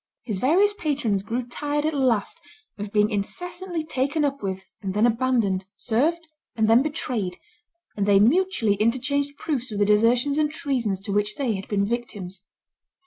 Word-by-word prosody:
His 210 -6 -2
various 370 - +3
patrons 285 - -1
grew 235 +5 -3
tired 290 +4 -2
at 315 - +1
last 255 0 +1 0.4
of 205 0 -5
being 210 0 +3
incessantly 350 - -3
taken 290 +1 0
up 280 0 -2
with 190 -1 -4 0.2
and 190 -2 -4
then 210 +2 +4
abandoned, 230 -6 +1
served 320 +9 0 0.3
and 220 -1 +2
then 225 +3 +6
betrayed; 240 -10 -2 0.6
and 200 -1 -1
they 200 -1 +6
mutually 250 - +3
interchanged 265 +7 0
proofs 255 -7 -3
of 210 - -4
the 205 - +3
desertions 235 +7 +3
and 300 -1 +2
treasons 245 - -1
to 200 0 -4
which 205 +1 +1
they 260 -6 0
had 195 -1 -5
been 200 -1 +1
victims. 200 -5 -5
240 Hz, 165 wpm, -24 LUFS, 205-290 Hz, 0.6 s, then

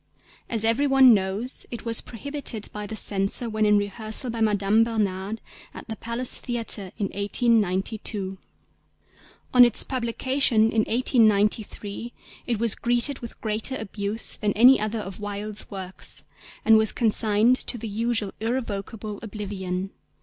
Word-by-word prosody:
As 225 -2 -1
every 230 +6 +2
one 265 -3 +7
knows, 200 +5 -1
it 235 -2 -8
was 230 -1 +1
prohibited 250 -3 -4
by 210 0 -5
the 220 - -6
Censor 200 +3 +3
when 215 0 +1
in 210 0 +5
rehearsal 215 +4 -2
by 230 0 -5
Madame 210 0 +3
Bernhardt 210 -2 -2 0.3
at - - -10
the 220 - -5
Palace 235 +3 -2
Theatre 230 -5 -2
in 200 -4 -2
1892. 200 -2 -1 1.1
On 250 -1 +9
its 240 - +4
publication 245 -2 +1
in 220 -1 +1
1893 220 -2 +1 0.3
it 235 - 0
was 230 0 +3
greeted 240 +3 +2
with 235 - -10
greater 220 +4 -1
abuse 210 -1 -3
than 210 -1 -1
any 250 +5 +6
other 215 +2 -2
of 195 -1 -8
Wilde's 205 0 -4
works, 190 -2 -4 0.4
and 220 -1 +6
was 220 -2 +4
consigned 220 +1 +2
to 245 - -2
the 230 0 -6
usual 220 -1 -1
irrevocable 215 -3 -4
oblivion. 195 -3 -5
220 Hz, 140 wpm, -24 LUFS, 205-235 Hz, 1.1 s, On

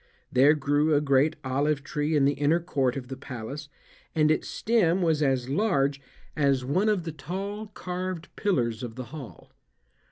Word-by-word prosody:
There 140 +4 +5
grew 145 +2 +2
a - - +5
great 145 +2 +3
olive 140 +2 0
tree 150 +1 -1
in 140 -2 +4
the 140 - +3
inner 145 +4 +2
court 135 -7 0
of 125 -2 -6
the 135 - -6
palace, 135 +3 -7 0.5
and 155 -1 +4
its 155 - 0
stem 190 -6 +2
was 160 -3 +2
as 130 -3 +1
large 140 -4 +1 0.3
as 140 -4 +2
one 185 +11 +2
of 205 -5 +1
the 165 - -4
tall 195 +8 -5
carved 180 -3 -5
pillars 120 - 0
of 120 -3 -6
the 130 - -5
hall. 140 -7 -10
150 Hz, 170 wpm, -27 LUFS, 135-170 Hz, 0.5 s, There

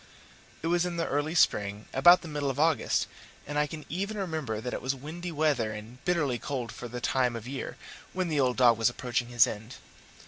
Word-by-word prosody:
It - - 0
was 175 0 +3
in 175 -1 -3
the 165 - 0
early 145 +4 -1
spring, 105 -9 +2
about 175 +8 +7
the - - -7
middle 145 -2 -2
of 135 +1 -3
August, 160 0 +2 0.4
and 145 +1 -2
I 150 - +2
can 155 +1 -8
even 200 +5 -3
remember 160 - -2
that 125 +3 -4
it - - -3
was 130 +1 -1
windy 165 +6 -6
weather 145 -8 +1
and 110 +4 -10
bitterly 150 -9 +1
cold 130 -5 -4
for 120 - -7
the 120 +1 -6
time 125 -1 +1
of 115 0 -6
year, 135 +1 -5 0.3
when 185 -1 -1
the 155 -3 0
old 125 -2 +2
dog 120 -3 +5
was 115 - +4
approaching 120 0 -2
his 120 +1 +5
end. 110 +1 -7
135 Hz, 215 wpm, -29 LUFS, 120-160 Hz, 0.4 s, about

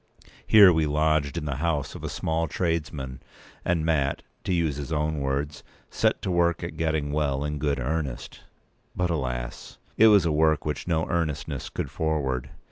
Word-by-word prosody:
Here 100 -4 +8
we 80 -1 +2
lodged 75 0 +1
in 80 - -3
the 70 -3 -3
house 75 -2 -1
of - - -9
a - - -3
small 80 +1 -1
tradesman; 75 -5 -3 0.4
and 85 -3 0
Mat, 70 -4 0 0.2
to - - -1
use 80 -5 +1
his 75 +2 -6
own 75 0 0
words, 70 +2 -2 0.3
"set - - +1
to 95 - -1
work 85 -1 +2
p. 85 - -2
205at 80 - -12
getting 80 -3 0
well 70 -2 0
in 75 0 -3
good 70 -2 0
earnest." 65 -2 -3 0.6
But, 90 -1 0
alas! 60 -5 -4 0.2
it 110 - +7
was 100 -5 +6
a 85 - +2
work 80 0 +2
which 75 +1 -3
no 80 -1 +1
earnestness 80 -5 -2
could - - -4
forward. 65 -5 -1
75 Hz, 180 wpm, -26 LUFS, 70-80 Hz, 0.6 s, Here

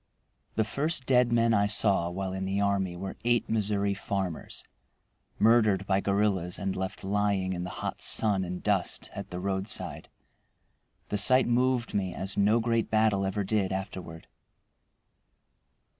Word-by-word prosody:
The 110 - +2
first 140 +5 0
dead 125 -2 +3
men 115 -1 +3
I 100 -1 +3
saw 100 -4 +3
while 95 +1 -4
in 95 0 -3
the 95 +1 -1
army 100 -3 0
were 95 +1 -6
eight 120 0 +1
Missouri 100 -2 +1
farmers 95 -4 -4 0.7
murdered 110 -4 +3
by 95 0 +1
guerrillas 100 -3 0
and 95 -1 -3
left 95 +1 -4
lying 100 -1 0
in 90 0 -4
the - - -5 0.2
hot - - -4
sun 100 -4 +3
and 90 0 -6
dust - - 0
at - - -7
the 90 - -5
roadside. 95 +2 -3 1.0
The 105 - -1
sight 130 +5 +5
moved 125 0 +1
me 95 -3 -1
as 95 +1 -4
no 105 +3 +3
great 115 0 0
battle 110 -3 +2
ever 100 +1 -2
did 100 -1 0
afterward. 95 -4 -6
100 Hz, 150 wpm, -28 LUFS, 95-110 Hz, 1.0 s, sight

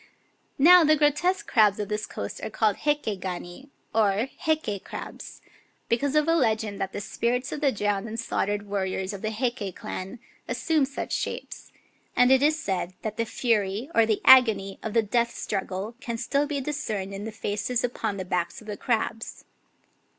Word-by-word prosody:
Now 345 +5 +8
the 310 0 +5
grotesque 305 +5 +2
crabs 210 -4 +4
of 205 - -2
this 210 0 -3
coast 100 - -6
are - - -3
called 215 -1 +1
Heike 290 -10 -1
gani, 180 +7 -6 0.2
or 215 +2 +2
" - - -30
Heike 300 -11 0
crabs," - - -8 0.5
because 270 +5 +1
of 305 0 +3
a 330 - +4
legend 220 -9 0
that 195 - -2
the - - -5
spirits 245 +5 -1
of 295 - -4
the 280 -2 +3
drowned 205 -1 -1
and 225 +1 -5
slaughtered 205 -2 -1
warriors 190 -1 -2
of 195 - -7
the 215 - -1
Heike 220 -4 -2
clan 190 +6 -6 0.3
assumed 310 -4 +1
such 275 - -5
shapes; - - -4 0.4
and 250 +1 +5
it 265 0 +6
is 305 +2 +3
said 185 - -3
that 215 -1 -4
the 230 - 0
fury 220 +2 0
or 230 -1 +4
the 215 -2 +1
agony 220 -7 +6
of 220 - -4
the 230 - +4
death 235 +2 0
struggle 195 +2 -3
can 235 -2 -4
still 280 +5 0
be 290 -2 -2
discerned 220 -9 -3
in 200 +2 -6
the 225 - -5
faces 215 +3 -2
upon 225 -4 -2
the 185 - -4
backs 175 -1 -2
of 220 - -15
the 210 -1 -5
crabs. 225 -1 -2
220 Hz, 185 wpm, -26 LUFS, 200-265 Hz, 0.5 s, Now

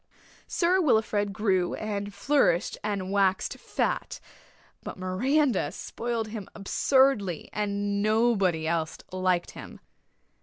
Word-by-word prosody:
Sir 365 +2 +2
Wilfrid 220 - +2
grew 190 -4 0
and 205 -1 -4
flourished 200 - +2
and 200 -3 -2
waxed 195 -2 +1
fat; - - -2 0.6
but - - -7
Miranda 200 - +1
spoiled 230 -2 -4
him 210 -3 -7
absurdly 210 - +1
and 205 -1 -1
nobody 210 -6 +2
else 160 -1 -1
liked 185 -1 0
him. - - -10
205 Hz, 105 wpm, -27 LUFS, 185-230 Hz, 0.6 s, Sir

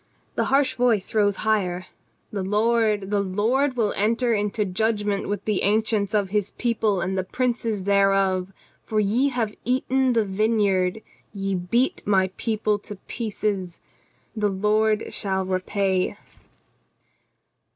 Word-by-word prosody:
The - - 0
harsh 270 -1 +2
voice 240 -6 +1
rose 205 -2 +3
higher: 185 -5 0 0.5
"The 200 - -3
Lord, 210 0 +1
the 205 - +2
Lord 235 +8 0
will 215 -3 +1
enter 230 +4 +1
into 210 0 0
judgment 205 +1 -1
with 205 -1 -3
the 210 -3 0
ancients 215 0 +1
of 200 -2 0
His 205 -1 0
people 220 -5 0
and 190 +2 -2
the 190 - 0
princes 230 -1 -1
thereof: 195 -1 +2 0.3
For 215 - -1
ye 225 +7 +2
have 230 -5 -2
eaten 260 +1 +1
the 225 -2 +2
vineyard, 200 -1 +1 0.3
ye 195 0 -2
beat 190 +8 0
my 190 -2 +3
people 215 -2 0
to 205 0 -9
pieces. 205 -5 -3 0.6
The 210 -2 +1
Lord 210 +2 +1
shall 190 -2 -1
repay." 185 0 0
210 Hz, 130 wpm, -24 LUFS, 195-225 Hz, 0.6 s, rose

